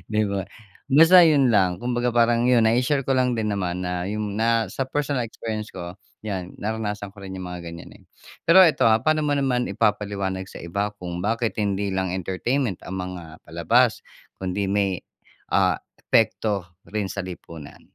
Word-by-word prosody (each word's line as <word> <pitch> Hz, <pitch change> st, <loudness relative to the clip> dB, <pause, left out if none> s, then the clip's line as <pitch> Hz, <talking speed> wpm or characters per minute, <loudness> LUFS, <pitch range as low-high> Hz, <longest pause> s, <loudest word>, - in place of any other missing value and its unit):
di 110 Hz, -, +3 dB
ba? 100 Hz, -2 st, -2 dB, 0.4 s
Basta 165 Hz, +6 st, +7 dB
yun 145 Hz, -5 st, +4 dB
lang. 95 Hz, -4 st, +2 dB
Kumbaga 120 Hz, 0 st, 0 dB
parang 120 Hz, 0 st, +3 dB
yun, 125 Hz, -2 st, +4 dB
nai-share 125 Hz, +5 st, +2 dB
ko -, -, -4 dB
lang 125 Hz, -1 st, +2 dB
din 110 Hz, -2 st, -1 dB
naman 90 Hz, -2 st, -2 dB
na 90 Hz, 0 st, -2 dB
yung 105 Hz, 0 st, -3 dB
na 115 Hz, 0 st, +2 dB
sa 135 Hz, -, -2 dB
personal 145 Hz, -3 st, -1 dB
experience 110 Hz, -1 st, -5 dB
ko 90 Hz, 0 st, -7 dB, 0.3 s
'yan, 95 Hz, -4 st, -4 dB
naranasan 105 Hz, -1 st, -4 dB
ko 100 Hz, -, -14 dB
rin 95 Hz, -, -7 dB
yung 95 Hz, -1 st, -6 dB
mga 85 Hz, -1 st, -7 dB
ganyan, 85 Hz, -, -11 dB
eh. -, -, -22 dB, 0.5 s
Pero 185 Hz, +3 st, +9 dB
'eto, 160 Hz, -8 st, +3 dB
ah. 110 Hz, 0 st, +4 dB
Pa'no 155 Hz, 0 st, +3 dB
mo 145 Hz, -, +2 dB
naman 130 Hz, -3 st, +1 dB
ipapaliwanag 100 Hz, -3 st, -1 dB
sa -, -, -10 dB
iba 100 Hz, +4 st, -2 dB
kung 90 Hz, -2 st, -6 dB
bakit 115 Hz, +4 st, -1 dB
hindi 100 Hz, -1 st, -1 dB
lang 95 Hz, -1 st, -1 dB
entertainment 95 Hz, -, -1 dB
ang 95 Hz, -, -5 dB
mga 85 Hz, -3 st, -8 dB
palabas -, -, +2 dB, 0.4 s
kundi 95 Hz, +2 st, -2 dB
may, 100 Hz, -2 st, 0 dB, 0.5 s
ah, -, -, +3 dB, 0.4 s
epekto 100 Hz, -4 st, +2 dB, 0.3 s
rin 105 Hz, -2 st, -1 dB
sa 100 Hz, -, -4 dB
lipunan? 85 Hz, -4 st, -10 dB
105 Hz, 175 wpm, -24 LUFS, 95-120 Hz, 0.5 s, Pero